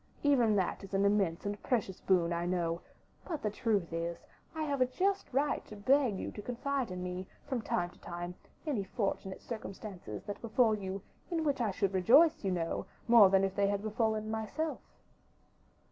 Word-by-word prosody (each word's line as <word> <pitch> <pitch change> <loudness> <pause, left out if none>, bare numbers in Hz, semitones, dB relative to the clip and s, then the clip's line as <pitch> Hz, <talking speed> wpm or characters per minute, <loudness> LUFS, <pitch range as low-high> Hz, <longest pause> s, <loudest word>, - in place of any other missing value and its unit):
Even 245 -7 +4
that 190 0 0
is 195 0 -5
an 195 +1 +3
immense 200 -5 +2
and 205 0 -3
precious 210 -7 -1
boon, 175 -3 +3
I 170 +1 -1
know; 170 -2 0 0.4
but 315 -5 -4
the 210 - 0
truth 205 -6 0
is, 170 0 -2 0.4
I 315 - -1
have 285 -3 -1
a 255 - +5
just 390 +9 0
right 275 +3 +1
to 215 - -9
beg 245 0 +3
you - - -4
to 210 - -7
confide 250 +2 -2
in 180 0 -5
me, 180 +1 -4 0.2
from 260 -4 -2
time 175 -4 -1
to - - -20
time, 175 +1 -5 0.3
any 270 -10 0
fortunate 195 -2 -3
circumstances 195 - -7
that 205 - -6
befall 230 0 +3
you, 195 -2 -4 0.3
in 335 -3 0
which 280 -4 +1
I 225 - +2
should 195 0 0
rejoice, 275 - +5
you 195 - +1
know, 170 -3 -2 0.2
more 230 -4 +8
than 195 0 +4
if 195 -1 0
they 200 -1 +3
had 200 0 -1
befallen 220 0 0
myself." 220 +9 -2
205 Hz, 190 wpm, -32 LUFS, 185-250 Hz, 0.4 s, more